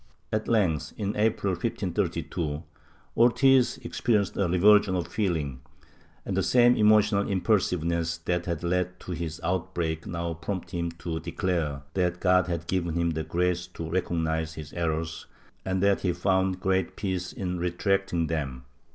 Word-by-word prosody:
At 110 Hz, 0 st, -1 dB
length, 95 Hz, -, +1 dB
in 100 Hz, -1 st, -2 dB
April 105 Hz, -2 st, +1 dB
1532, 80 Hz, -2 st, -2 dB, 0.5 s
Ortiz 130 Hz, +2 st, +4 dB
experienced 105 Hz, -6 st, 0 dB
a 100 Hz, -, +1 dB
revulsion 95 Hz, +2 st, +5 dB
of 90 Hz, -3 st, -1 dB
feeling, 80 Hz, -, -1 dB, 0.7 s
and -, -, -2 dB
the -, -, +2 dB
same 120 Hz, 0 st, +5 dB
emotional 105 Hz, -1 st, +4 dB
impulsiveness 85 Hz, -4 st, +1 dB
that 85 Hz, +1 st, -2 dB
had 85 Hz, -2 st, -2 dB
led 90 Hz, +1 st, -1 dB
to -, -, -7 dB
his 80 Hz, -2 st, -4 dB
outbreak 85 Hz, -2 st, -2 dB
now 85 Hz, -1 st, -3 dB
prompted 90 Hz, +2 st, -5 dB
him 85 Hz, 0 st, -2 dB
to 85 Hz, -1 st, -4 dB
declare 80 Hz, -9 st, -2 dB
that 90 Hz, -2 st, 0 dB
God 90 Hz, 0 st, +3 dB
had 85 Hz, -2 st, -3 dB
given 85 Hz, -3 st, -1 dB
him 85 Hz, 0 st, +1 dB
the 80 Hz, 0 st, -2 dB
grace 90 Hz, +2 st, 0 dB
to 80 Hz, -, -5 dB
recognize 80 Hz, -3 st, -1 dB
his 75 Hz, -1 st, -8 dB
errors 80 Hz, -1 st, -2 dB, 0.4 s
and 95 Hz, 0 st, -1 dB
that 100 Hz, -1 st, +3 dB
he 90 Hz, -2 st, +1 dB
found 95 Hz, +1 st, +1 dB
great 95 Hz, +1 st, 0 dB
peace 95 Hz, -2 st, -3 dB
in 90 Hz, -2 st, -3 dB
retracting 90 Hz, 0 st, 0 dB
them. 70 Hz, -6 st, -3 dB
90 Hz, 150 wpm, -27 LUFS, 85-95 Hz, 0.7 s, revulsion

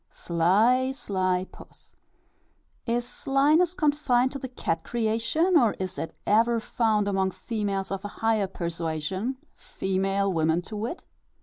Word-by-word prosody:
Sly, 215 Hz, +10 st, +2 dB
sly 185 Hz, -7 st, -1 dB
puss. -, -, -16 dB, 0.9 s
Is 240 Hz, +1 st, 0 dB
slyness 295 Hz, +8 st, +2 dB
confined 285 Hz, -5 st, +2 dB
to 275 Hz, -, -5 dB
the 260 Hz, -, -5 dB
cat 165 Hz, -9 st, -3 dB
creation, 235 Hz, +10 st, 0 dB
or 240 Hz, -9 st, +5 dB
is 185 Hz, -1 st, -4 dB
it 165 Hz, -, -5 dB
ever 230 Hz, +3 st, +3 dB
found 220 Hz, -2 st, 0 dB
among 190 Hz, -1 st, +1 dB
females 200 Hz, -2 st, -3 dB
of 195 Hz, 0 st, -3 dB
a -, -, -3 dB
higher 220 Hz, -1 st, 0 dB
persuasion 170 Hz, -, -3 dB, 0.2 s
female 195 Hz, +1 st, -1 dB
women 160 Hz, +1 st, +1 dB
to 215 Hz, -, -8 dB
wit? 225 Hz, -, -4 dB
215 Hz, 130 wpm, -26 LUFS, 190-245 Hz, 0.9 s, or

